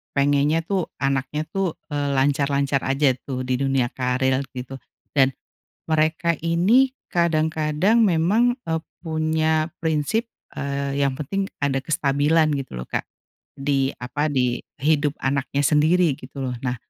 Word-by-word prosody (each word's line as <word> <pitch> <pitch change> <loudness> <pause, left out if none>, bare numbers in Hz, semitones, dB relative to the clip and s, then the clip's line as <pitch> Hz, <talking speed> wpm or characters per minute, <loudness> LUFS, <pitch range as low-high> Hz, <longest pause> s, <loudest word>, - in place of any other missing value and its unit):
pengennya 145 +3 +2
tuh, 185 -1 -1
anaknya 135 +2 -1
tuh, 195 -4 -1 0.2
eee, 145 -1 -1
lancar-lancar 140 0 +1
aja 135 0 +3 0.2
tuh 130 -1 -3
di 125 0 -1
dunia 135 -3 +1
karir 130 +1 0 0.2
gitu, 130 +1 -6 0.3
dan, 135 -2 +3 0.5
mereka 160 +1 +1
ini 215 +11 +4 0.2
kadang-kadang 160 +5 +2
memang, 200 +7 +3 0.2
eee, 160 0 -1 0.2
punya 160 0 0
prinsip, 165 - 0 0.2
eee, 140 0 -3
yang 140 -2 +1
penting 195 +8 -2 0.2
ada 135 -1 +1
kestabilan 150 +2 +2
gitu 130 - -8
loh, 60 - -5
Kak. - - -4 0.5
Di, 135 -1 +1
apa, 145 +5 -2
di 125 -4 0 0.2
hidup 150 -1 +2
anaknya 140 +1 0
sendiri 155 +3 +4
gitu 135 +1 -7
loh. 125 -1 -2
Nah, 125 -1 -2
145 Hz, 130 wpm, -23 LUFS, 135-160 Hz, 0.5 s, ini